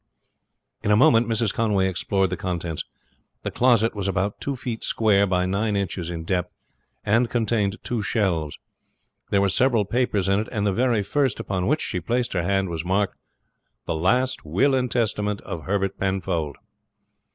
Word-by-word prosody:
In 105 Hz, -, -2 dB
a 105 Hz, -, +6 dB
moment 115 Hz, -1 st, +5 dB
Mrs. 115 Hz, -2 st, 0 dB
Conway 105 Hz, -4 st, +1 dB
explored 95 Hz, +1 st, 0 dB
the -, -, 0 dB
contents. 85 Hz, -2 st, -3 dB, 0.6 s
The -, -, -3 dB
closet 120 Hz, -3 st, +3 dB
was 100 Hz, -2 st, -3 dB
about 95 Hz, +1 st, -1 dB
two 140 Hz, -, -2 dB
feet 120 Hz, -2 st, -5 dB
square 100 Hz, -3 st, +3 dB
by 90 Hz, -1 st, +1 dB
nine 100 Hz, +3 st, 0 dB
inches 90 Hz, -3 st, -2 dB
in 85 Hz, -1 st, -5 dB
depth, 90 Hz, +1 st, -1 dB, 0.6 s
and 115 Hz, +3 st, +3 dB
contained 110 Hz, -3 st, 0 dB
two 120 Hz, -3 st, -2 dB
shelves. 90 Hz, -9 st, -1 dB, 0.7 s
There 100 Hz, -, +3 dB
were 100 Hz, -, +3 dB
several 115 Hz, +1 st, +3 dB
papers 105 Hz, -3 st, 0 dB
in 95 Hz, +1 st, +3 dB
it, 110 Hz, -, -3 dB
and 105 Hz, -3 st, -1 dB
the 100 Hz, -, +2 dB
very 120 Hz, -1 st, +2 dB
first 135 Hz, +3 st, 0 dB
upon 95 Hz, -2 st, -2 dB
which 150 Hz, +3 st, +1 dB
she 90 Hz, -, -2 dB
placed 120 Hz, +8 st, -1 dB
her 90 Hz, -, +1 dB
hand 95 Hz, +2 st, +1 dB
was 80 Hz, -1 st, -3 dB
marked 95 Hz, +3 st, 0 dB, 0.7 s
"The -, -, -1 dB
Last 125 Hz, +11 st, +1 dB
Will 100 Hz, -, +2 dB
and 130 Hz, -1 st, +1 dB
Testament 105 Hz, -4 st, 0 dB
of 80 Hz, -2 st, -7 dB
Herbert 95 Hz, 0 st, -1 dB
Penfold." 95 Hz, -6 st, -1 dB
100 Hz, 175 wpm, -24 LUFS, 95-115 Hz, 0.7 s, a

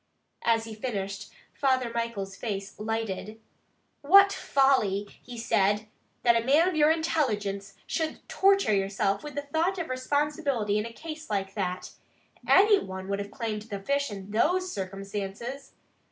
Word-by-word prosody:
As 225 Hz, -1 st, +2 dB
he 225 Hz, -1 st, -7 dB
finished 200 Hz, -3 st, -4 dB, 0.2 s
Father 260 Hz, -3 st, +1 dB
Michael's 230 Hz, -4 st, -3 dB
face 200 Hz, -2 st, -4 dB
lighted. 220 Hz, -1 st, -3 dB, 0.6 s
"What 395 Hz, +7 st, +7 dB
folly!" 215 Hz, -8 st, +2 dB
he 245 Hz, -1 st, -10 dB
said, 210 Hz, -2 st, +2 dB, 0.4 s
"that 235 Hz, -1 st, +5 dB
a 230 Hz, -, +2 dB
man 295 Hz, +7 st, +4 dB
of 370 Hz, -, 0 dB
your 300 Hz, 0 st, +5 dB
intelligence 210 Hz, -12 st, 0 dB
should 320 Hz, -1 st, -3 dB
torture 390 Hz, -, +3 dB
yourself 195 Hz, 0 st, 0 dB
with 295 Hz, -1 st, -8 dB
the 285 Hz, -, -2 dB
thought 320 Hz, +6 st, 0 dB
of 340 Hz, -2 st, -4 dB
responsibility 265 Hz, -5 st, 0 dB
in 210 Hz, -, -2 dB
a -, -, -9 dB
case 310 Hz, +3 st, -8 dB
like 195 Hz, -2 st, -2 dB
that. 185 Hz, -3 st, -3 dB, 0.6 s
Any 410 Hz, +1 st, +6 dB
one 190 Hz, -, -7 dB
would 200 Hz, 0 st, -1 dB
have 200 Hz, 0 st, -4 dB
claimed 220 Hz, -2 st, -4 dB
the 205 Hz, -2 st, -6 dB
fish 280 Hz, +7 st, 0 dB
in 200 Hz, -1 st, -8 dB
those 360 Hz, -, +2 dB
circumstances. 195 Hz, +7 st, -5 dB
230 Hz, 150 wpm, -28 LUFS, 200-285 Hz, 0.6 s, What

